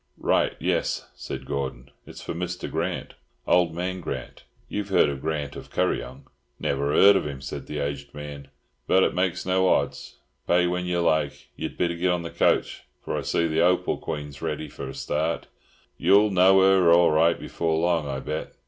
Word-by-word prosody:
"Right, - - +1
yes," - - -1
said - - -7
Gordon. 70 -1 -4 0.2
"It's - - -10
for - - -4
Mr. 90 +1 -4
Grant, - - -3 0.3
Old 85 -2 +3
Man 90 +1 -3
Grant,—you've 80 +9 -7
heard 95 - +4
of 70 -1 -5
Grant 75 -3 -3
of - - -9
Kuryong?" 65 +1 -2 0.3
"Never 70 +1 -1
'eard 100 +5 +7
of 95 - 0
him," 70 -2 -6
said 65 0 -7
the 75 - -5
aged 70 -1 -4
man, 75 -1 -8 0.4
"but 95 - +4
it - - +1
makes 90 -1 -1
no 95 0 +2
hodds. 70 - -1 0.3
Pay 90 0 +4
when 90 0 -1
yer 90 -1 0
like. 80 -4 0
Yer'd - - -5
better 85 -1 +1
git 90 +2 0
on 90 -1 0
the 85 - -6
coach, - - +1 0.2
for - - -2
I - - -1
see 85 - 0
the 80 -1 0
Hopal 90 +2 +2
Queen's 75 -2 -6
ready 80 -1 -3
for 70 - -7
a 65 - -8
start. 80 +2 -2 0.5
Yer'll 105 +1 +5
know 95 +1 +6
her 95 -3 +5
all 85 0 +6
right 80 +2 +3
before 80 -1 -1
long, 85 -2 +1
I 65 -1 -3
bet. 75 +3 -5
85 Hz, 185 wpm, -25 LUFS, 70-90 Hz, 0.5 s, eard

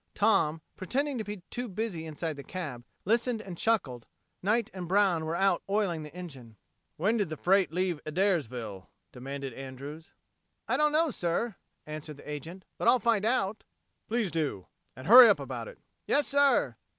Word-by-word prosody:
Tom, 195 -7 +2 0.2
pretending 270 +7 -1
to - - -2
be 205 0 -5 0.3
busy 190 -5 -4
inside 160 +1 -3
the 140 - -8
cab, 145 -10 -6 0.2
listened 230 +3 +1
and 195 -4 -7
chuckled. 155 - 0 0.3
Knight 215 +4 +1
and 180 -2 -6
Brown 185 -4 +3
were 160 +1 -2
out 195 +2 +2
oiling 195 -5 0
the 150 -1 -9
engine. 135 -11 -10 0.4
"When 210 +8 +2
did 205 -6 0
the 155 - -5
freight 190 -1 +3
leave 180 -2 -1
Adairsville?" 130 - -1 0.2
demanded 135 +1 -6
Andrews. 135 +5 -9 0.5
"I - - +1
don't 300 0 +3
know, 315 0 +2
sir," 185 +4 -1 0.3
answered 155 -1 -7
the - - -14
agent, 160 +6 -7
"but - - 0
I'll 245 +2 +7
find 230 -4 +1
out." 220 -3 +1
"Yes, - - -38
please 225 -5 0
do 150 - -2 0.3
and 130 - -10
hurry 240 +4 +10
up 205 - +4
about - - -5
it." - - -11 0.3
"Yes, 290 - +3
sir." 285 -1 +3
180 Hz, 170 wpm, -29 LUFS, 150-220 Hz, 0.5 s, hurry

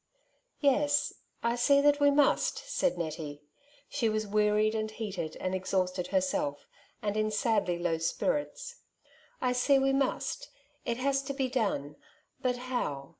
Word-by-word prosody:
^' - - -50 0.6
Yes, 290 0 +3 0.3
I 235 0 +2
see 280 +4 +4
that 290 0 +4
we 285 0 +6
must,'' 285 0 +2
said 385 - 0
Nettie. 155 -3 -5 0.4
She 250 -6 0
was 215 0 -1
wearied, 210 +1 +2
and 215 -1 -1
heated, 195 -8 -5
and 185 - -2
exhausted 185 -1 -1
herself, 180 -6 0 0.4
and 205 -1 -1
in 215 0 +1
sadly 215 -5 +1
low 170 -2 0
spirits, 295 - -2 0.3
^^ - - -32 0.3
I 250 -1 +2
see 260 +3 +4
we 270 0 +2
must 275 - -1 0.2
\ - - -38
it 235 -1 -1
has 275 +1 +1
to 275 0 -5
be 265 -2 0
done, 195 - -1 0.4
but 250 -1 0
how 245 - -3
225 Hz, 160 wpm, -30 LUFS, 185-275 Hz, 0.6 s, we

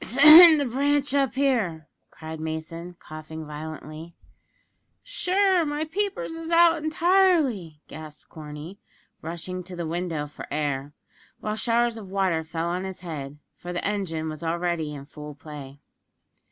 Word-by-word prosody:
"Send 310 +5 +9
the 285 - 0
branch 280 +2 +1
up 275 -3 +1
here," 220 - 0 0.2
cried 160 0 -9
Mason, 160 +2 -6
coughing 155 0 -9
violently. 155 +2 -8 0.9
"Sure, 385 -6 +2
my 295 0 -2
peepers 405 +6 -3
is 330 0 -7
out 335 -2 +4
entirely!" 315 - +2
gasped 155 -1 -11
Corney, 155 +4 -9 0.4
rushing 170 +3 -5
to 180 +1 -9
the 170 -1 -4
window 165 -2 -3
for 145 - -10
air; 145 -1 -2 0.5
while 215 0 -3
showers 235 +1 +1
of 205 -4 -9
water 190 -4 0
fell 165 +1 -4
on 180 +2 -2
his 190 -2 -7
head, 150 -5 -7 0.2
for 175 - -8
the 175 - -3
engine 175 -6 -2
was 155 -1 -6
already 170 -2 -1
in 140 -1 -9
full 150 0 -10
play. 145 -2 -10
175 Hz, 140 wpm, -25 LUFS, -, 0.9 s, Send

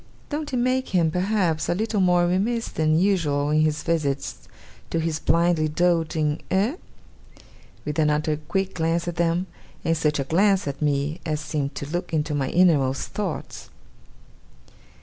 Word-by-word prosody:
Don't 295 0 -3
it 255 - -1
make 255 +2 +1
him, 165 -3 +3
perhaps, 180 -4 0
a - - +2
little 215 +1 -1
more 180 -1 +4
remiss 210 +7 0
than 155 0 +1
usual 155 -6 +1
in 155 0 +3
his 155 0 0
visits 140 - -2 0.4
to - - -1
his 160 -1 -1
blindly 170 -2 +2
doting 160 -2 +1
eh?' 210 - +1 1.1
With 150 +1 -3
another 150 0 +1
quick 190 +6 -2
glance 165 0 0
at 175 0 -4
them, 170 +1 +1 0.4
and 165 - +2
such 150 -2 +1
a 140 - 0
glance 190 +5 +2
at 140 +1 -5
me 145 +2 0
as 155 -1 -2
seemed 145 -2 -3
to 140 - -4
look 175 -1 -2
into 150 0 -1
my 135 -2 -1
innermost 145 -7 +2
thoughts. 200 -6 -5
165 Hz, 155 wpm, -24 LUFS, 150-185 Hz, 1.1 s, more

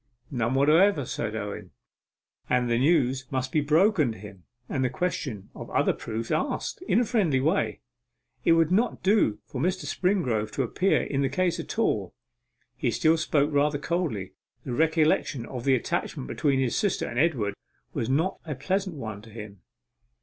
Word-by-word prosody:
'None 120 -1 0
whatever,' 155 +3 +4
said 110 - -3
Owen; 105 -2 -5 0.8
'and 125 -1 +2
the 115 - +2
news 135 -3 +2
must 130 -1 -2
be 155 - +2
broken 155 - +3
to - - -12
him, 95 -2 -12 0.2
and 130 - -1
the 125 - +2
question 140 - -3
of - - -9
other - - +2
proofs 115 0 -5
asked, 270 +4 -1
in - - +4
a 245 - +2
friendly 190 - +2
way. 160 +9 0 0.6
It 165 - +5
would 165 0 +3
not 225 +6 +1
do 195 - +3
for 130 - -5
Mr. 185 +4 0
Springrove 130 - 0
to 135 - 0
appear 185 +10 +1
in 140 -1 -1
the 135 - +1
case 175 +3 0
at 165 - -6
all.' - - 0 0.6
He - - 0
still 160 +1 +3
spoke 150 -2 +1
rather 145 +1 +2
coldly; 145 - -2 0.3
the 125 - -3
recollection 155 -4 +2
of 125 -1 -7
the 135 -1 +5
attachment 65 - -3
between 140 - +1
his 130 -3 0
sister 205 -4 0
and 120 - -3
Edward 130 -11 +1 0.4
was 115 - -2
not 160 +8 +1
a 150 -4 -5
pleasant 185 +6 -1
one 110 -6 -6
to 110 - -14
him. 105 -3 -10
140 Hz, 175 wpm, -27 LUFS, 120-170 Hz, 0.8 s, It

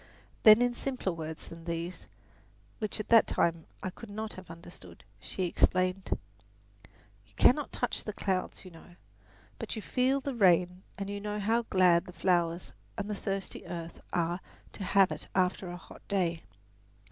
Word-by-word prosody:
Then 215 +2 +9
in 245 0 +2
simpler 255 -6 -2
words 160 -1 -6
than 165 0 -11
these, 170 +1 -4 0.7
which 215 -1 -3
at 215 - -5
that 230 -1 +7
time 165 -1 +1 0.2
I 185 - -2
could 230 +4 -11
not 215 +1 -4
have 185 -2 -11
understood, 165 - -12 0.2
she 185 - -3
explained: 185 +1 +1 1.1
"You 105 - -26
cannot 285 - +4
touch 245 - -2
the 210 - -3
clouds, 190 -2 -2
you 185 - -10
know; 175 +1 -15 0.6
but - - -4
you 220 - -4
feel 260 +2 +2
the 275 0 -3
rain 180 -4 +4 0.2
and 195 0 -4
know 210 0 -3
how 225 +3 +1
glad 180 -2 +5
the 180 - -9
flowers 175 -2 +1 0.2
and 205 0 -3
the - - -1
thirsty 195 -1 -4
earth 170 -1 -6
are 175 0 0 0.3
to 200 - -7
have 195 0 +4
it - - -5
after 185 0 +1
a 175 - -6
hot - - -14
day. 175 -4 0
185 Hz, 165 wpm, -31 LUFS, 170-210 Hz, 1.1 s, Then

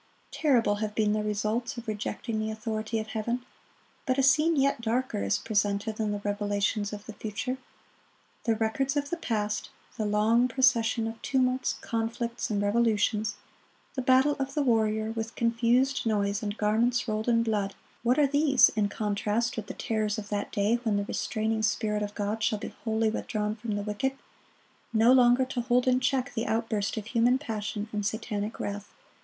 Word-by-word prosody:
Terrible 240 -9 +2
have 210 0 -3
been 210 -1 +2
the 215 - 0
results 215 +5 -1
of 235 0 -7
rejecting 215 +1 -3
the 215 0 -1
authority 220 0 -3
of 220 - -2
Heaven. 235 +3 -2 0.6
But 255 0 +2
a 270 - +3
scene 305 +5 +4
yet 275 -3 +2
darker 235 - -1
is 100 0 +1
presented 205 0 -1
in 215 -1 0
the 205 0 -3
revelations 205 0 -1
of 210 0 -7
the 220 - -8
future. 220 +5 -4 0.9
The 225 -2 +2
records 265 +6 0
of 285 0 -2
the 345 - -1
past,—the 215 -4 -3
long 220 +4 +3
procession 235 -3 +2
of 225 0 -6
tumults, 255 -1 +1
conflicts, 230 +1 -2
and 210 -2 0
revolutions, 215 0 +1 0.6
the 265 - -2
"battle 260 +3 +4
of 275 0 -3
the 295 - +2
warrior, 220 -3 +1
with 225 0 -4
confused 235 +3 +2
noise, 205 -2 0
and 205 0 -3
garments 235 +4 +1
rolled 215 +1 -1
in 230 -1 +3
blood,"(49)—what 220 +3 -2
are 295 - +5
these, 285 -1 +5
in 210 -2 0
contrast 210 +3 -1
with 220 -2 -5
the - - -6
terrors 215 -1 -1
of 210 -1 -6
that 205 -1 -2
day 210 +4 +1
when 220 -4 +1
the 200 - -1
restraining 220 +1 -1
Spirit 210 -1 0
of 205 0 -4
God 210 +2 -2
shall 215 0 +1
be - - -7
wholly 220 -1 +1
withdrawn 210 -1 -2
from 220 -1 -4
the 205 - -2
wicked, 215 +6 -1 0.8
no 230 +2 +5
longer 250 0 +5
to 255 -1 -3
hold 245 +1 +2
in 255 0 +4
check 260 0 0
the 225 - -2
outburst 220 -2 -1
of 215 - -4
human 240 +3 +3
passion 215 -5 -4
and 210 -1 -1
satanic 215 0 -3
wrath! 205 0 -4
220 Hz, 175 wpm, -28 LUFS, 210-245 Hz, 0.9 s, are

